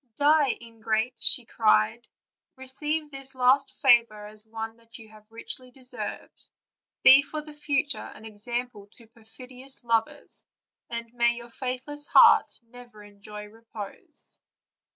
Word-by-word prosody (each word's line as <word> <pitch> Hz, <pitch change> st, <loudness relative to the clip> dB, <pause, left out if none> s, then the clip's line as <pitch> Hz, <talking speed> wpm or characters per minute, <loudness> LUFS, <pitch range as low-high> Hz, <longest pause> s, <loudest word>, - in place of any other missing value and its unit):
"Die, 290 Hz, -2 st, +3 dB
ingrate!" 225 Hz, +1 st, -2 dB, 0.3 s
cried 215 Hz, -, +2 dB
she; -, -, -26 dB, 0.5 s
'"'receive 295 Hz, +4 st, -3 dB
this 270 Hz, -1 st, -9 dB
last 260 Hz, +2 st, +3 dB
favor 235 Hz, -5 st, +4 dB
as 215 Hz, +1 st, -4 dB
one 225 Hz, 0 st, -6 dB
that 230 Hz, 0 st, -11 dB
you 225 Hz, -2 st, -14 dB
have 215 Hz, 0 st, -18 dB
richly 250 Hz, +2 st, -4 dB
deserved; 255 Hz, 0 st, -6 dB, 0.5 s
be 265 Hz, +1 st, +9 dB
for 305 Hz, +1 st, -6 dB
the 300 Hz, 0 st, -12 dB
future 285 Hz, -1 st, -1 dB, 0.2 s
an 220 Hz, -, -13 dB
example 225 Hz, 0 st, -5 dB
to 230 Hz, +3 st, -18 dB
perfidious 250 Hz, +4 st, -9 dB
lovers, 230 Hz, -1 st, -1 dB, 0.5 s
and 235 Hz, 0 st, -6 dB
may 235 Hz, 0 st, +2 dB
your 235 Hz, 0 st, -10 dB
faithless 260 Hz, +4 st, -4 dB
heart -, -, +6 dB
never 235 Hz, -2 st, -14 dB
enjoy 205 Hz, +1 st, -9 dB
repose." 225 Hz, -, -6 dB
235 Hz, 130 wpm, -26 LUFS, 220-265 Hz, 0.5 s, be